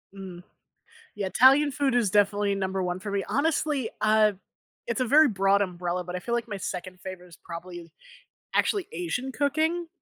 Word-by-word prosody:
Mm, 185 Hz, -2 st, -9 dB, 0.7 s
yeah, 205 Hz, -2 st, -3 dB
Italian 270 Hz, +8 st, +5 dB
food 280 Hz, -2 st, 0 dB
is 235 Hz, -5 st, +2 dB
definitely 205 Hz, 0 st, +2 dB
number 190 Hz, -1 st, -2 dB
one 180 Hz, 0 st, -2 dB
for 205 Hz, +1 st, -5 dB
me. 200 Hz, -1 st, -1 dB
Honestly, 290 Hz, -4 st, 0 dB
ah, 215 Hz, 0 st, +4 dB, 0.5 s
it's 235 Hz, 0 st, -2 dB
a -, -, +3 dB
very 295 Hz, +5 st, +6 dB
broad 195 Hz, -2 st, +2 dB
umbrella, 180 Hz, -1 st, -3 dB
but 180 Hz, +1 st, -5 dB
I -, -, -2 dB
feel 235 Hz, +6 st, -3 dB
like 235 Hz, 0 st, -2 dB
my 205 Hz, -, -4 dB
second 185 Hz, -1 st, -6 dB
favorite 180 Hz, -1 st, -9 dB
is 170 Hz, -, -16 dB
probably, 170 Hz, -1 st, -9 dB, 0.6 s
actually 400 Hz, -4 st, +1 dB
Asian 180 Hz, +11 st, -3 dB
cooking? 315 Hz, +5 st, 0 dB
205 Hz, 175 wpm, -26 LUFS, 180-260 Hz, 0.7 s, very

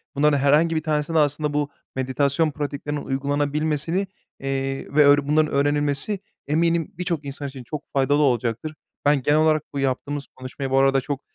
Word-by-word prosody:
bunların 145 Hz, 0 st, +3 dB
herhangi 150 Hz, +4 st, +3 dB
bir 155 Hz, -, -1 dB
tanesine 155 Hz, 0 st, -1 dB
de 160 Hz, -, +5 dB
aslında 150 Hz, 0 st, +1 dB
bu 145 Hz, -1 st, 0 dB, 0.3 s
meditasyon 140 Hz, +4 st, +1 dB
pratiklerinin 145 Hz, 0 st, -4 dB
uygulanabilmesini, 145 Hz, +6 st, -1 dB, 0.3 s
eee, 135 Hz, 0 st, -3 dB
ve 150 Hz, -, +7 dB
ör 145 Hz, 0 st, +5 dB
bunların 155 Hz, +1 st, +2 dB
öğrenilmesi 145 Hz, +6 st, +1 dB, 0.3 s
eminim 165 Hz, +1 st, +1 dB
birçok 170 Hz, -5 st, -2 dB
insan 140 Hz, +1 st, -5 dB
için 135 Hz, -2 st, -9 dB
çok 150 Hz, +4 st, -6 dB
faydalı 140 Hz, +2 st, +2 dB
olacaktır. 125 Hz, +2 st, 0 dB, 0.3 s
Ben 145 Hz, -2 st, +4 dB
genel 145 Hz, +4 st, +3 dB
olarak 155 Hz, -1 st, +3 dB
bu 140 Hz, -, -2 dB
yaptığımız 135 Hz, +2 st, -2 dB
konuşmayı 130 Hz, +1 st, -6 dB
bu 135 Hz, -, +3 dB
arada 135 Hz, 0 st, +4 dB
çok, 140 Hz, 0 st, -4 dB
145 Hz, 165 wpm, -23 LUFS, 135-155 Hz, 0.3 s, ve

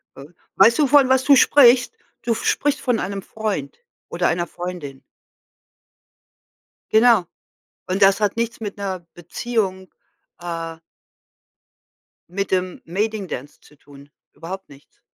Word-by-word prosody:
Öh, 140 Hz, +2 st, -11 dB, 0.3 s
weißt 230 Hz, +8 st, +5 dB
du 290 Hz, -, +4 dB
von 275 Hz, -1 st, +5 dB
was 265 Hz, +1 st, +3 dB
du 280 Hz, -, +7 dB
sprichst? 255 Hz, -, +5 dB, 0.3 s
Du 235 Hz, -, 0 dB
sprichst 290 Hz, +5 st, 0 dB
von 245 Hz, -3 st, 0 dB
einem 195 Hz, +1 st, -4 dB
Freund 220 Hz, -, -4 dB, 0.3 s
oder -, -, 0 dB
einer 175 Hz, 0 st, -1 dB
Freundin. 175 Hz, -7 st, -7 dB, 1.9 s
Genau. 220 Hz, -4 st, +5 dB, 0.6 s
Und 190 Hz, +2 st, -1 dB
das 195 Hz, +2 st, +5 dB
hat 210 Hz, +1 st, 0 dB
nichts 230 Hz, 0 st, -3 dB
mit 205 Hz, -2 st, -6 dB
'ner 190 Hz, -3 st, -4 dB
Beziehung, 190 Hz, +1 st, -3 dB, 0.5 s
äh 165 Hz, -1 st, -5 dB, 1.5 s
mit 195 Hz, +1 st, -4 dB
dem 185 Hz, -1 st, -1 dB
Mading 205 Hz, +3 st, -2 dB
Dance 140 Hz, +4 st, -7 dB
zu 150 Hz, -, -21 dB
tun, 140 Hz, 0 st, -17 dB, 0.2 s
überhaupt 190 Hz, +4 st, -8 dB
nichts. 140 Hz, 0 st, -19 dB
195 Hz, 125 wpm, -21 LUFS, 175-235 Hz, 1.9 s, du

